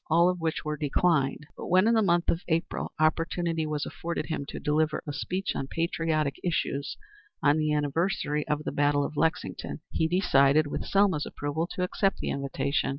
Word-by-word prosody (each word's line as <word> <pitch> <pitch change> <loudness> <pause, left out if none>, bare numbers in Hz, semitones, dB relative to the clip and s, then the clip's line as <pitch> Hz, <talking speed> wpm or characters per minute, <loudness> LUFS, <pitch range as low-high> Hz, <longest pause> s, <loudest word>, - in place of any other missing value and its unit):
All 170 +2 +5
of 180 -1 -2
these 160 -1 -1
were 150 0 -2
declined, 150 -1 +1
but - - -7
when, 185 +4 +4
in 230 - +4
the 225 - +4
month 175 -3 +2
of 170 - +1
April, 165 0 -1
opportunity 165 +1 +1
was 150 -1 -2
afforded 170 0 -4
him 155 -4 -4
to - - -6
deliver 155 +1 0
a 145 - -4
speech 185 +6 -2
on 135 - -3
patriotic 160 -2 -1
issues 145 -5 -1 0.5
on 145 +1 +4
the 155 0 +1
anniversary 150 0 0
of 150 0 -1
the - - -3
battle 145 0 +2
of 150 - -6
Lexington, 160 0 -1
he 160 - +1
decided, 155 -4 +4
with 145 - -4
Selma's 195 -7 +2
approval, 145 +3 -3
to 180 - -2
accept 195 +2 +1
the - - -3
invitation. 140 +1 -1
155 Hz, 185 wpm, -28 LUFS, 145-170 Hz, 0.5 s, All